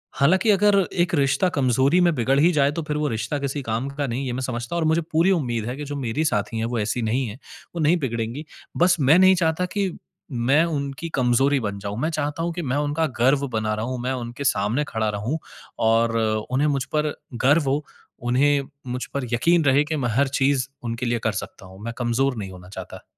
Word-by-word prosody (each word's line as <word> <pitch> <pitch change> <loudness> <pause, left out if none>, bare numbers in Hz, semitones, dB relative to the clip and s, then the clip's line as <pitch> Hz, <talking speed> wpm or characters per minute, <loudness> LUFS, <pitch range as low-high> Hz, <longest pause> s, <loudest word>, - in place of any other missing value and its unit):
हालाँकि 185 +10 +3
अगर 205 0 +4
एक 175 -1 +1
रिश्ता 140 +5 +2
कमज़ोरी 135 +3 +2
में 175 -1 +4
बिगड़ 135 +2 +2
ही 165 +4 +5
जाए 140 -1 +3
तो 165 +3 -3
फिर 150 0 -1
वो 150 - 0
रिश्ता 115 +6 -2
किसी 140 +1 -3
काम 115 +3 -2
का 140 0 -3
नहीं 125 +3 -3
ये 125 - -2
मैं 130 - -3
समझता 120 +3 -4
हूँ। 170 - 0
और 155 - +2
मुझे 160 +1 +2
पूरी 170 +5 +4
उम्मीद 120 - 0
है 125 - -3
कि 150 - -5
जो 145 - -5
मेरी 135 +4 -1
साथी 110 -5 -1
हैं 115 - -1
वो 115 -1 -2
ऐसी 110 +3 -1
नहीं 120 +3 0
हैं, 110 +4 -8 0.4
वो 170 - -2
नहीं 160 +4 +4
बिगड़ेंगी, 120 +2 -3 0.3
बस 175 0 +4
मैं 145 +6 +5
नहीं 190 0 +6
चाहता 165 +1 +1
कि 195 -3 0 0.4
मैं 130 +6 +3
उनकी 145 0 -3
कमज़ोरी 135 +2 +3
बन 100 -2 -3
जाऊँ। 100 +2 -5
मैं 155 - +1
चाहता 155 +1 -2
हूँ 170 0 -2
कि 175 - -4
मैं 135 -2 -1
उनका 150 +2 0
गर्व 135 +3 +3
बना 110 -1 0
रहूँ, 120 +4 -3
मैं 130 - -1
उनके 125 +2 -5
सामने 115 +4 +1
खड़ा 110 -1 -1
रहूँ 105 +9 -2 0.5
और 115 0 +3 0.3
उन्हें 140 +4 +2
मुझ 140 -3 0
पर 150 -1 +1 0.3
गर्व 145 +1 +4
हो, 145 +2 0 0.3
उन्हें 135 +3 +2 0.2
मुझ 125 +1 -3
पर 140 -2 -1
यकीन 165 +8 +3
रहे 140 +1 +4
कि 155 - -2
मैं 120 -3 -1
हर 140 +2 +3
चीज़ 135 -1 +2 0.2
उनके 115 +1 -3
लिए 120 0 0
कर 110 - +2
सकता 95 -1 -7
हूँ, 95 +1 -14
मैं 115 - -4
कमज़ोर 125 +2 0
नहीं 95 -3 -5
होना 90 -1 -12
चाहता। 95 -2 -9
135 Hz, 225 wpm, -23 LUFS, 120-150 Hz, 0.5 s, नहीं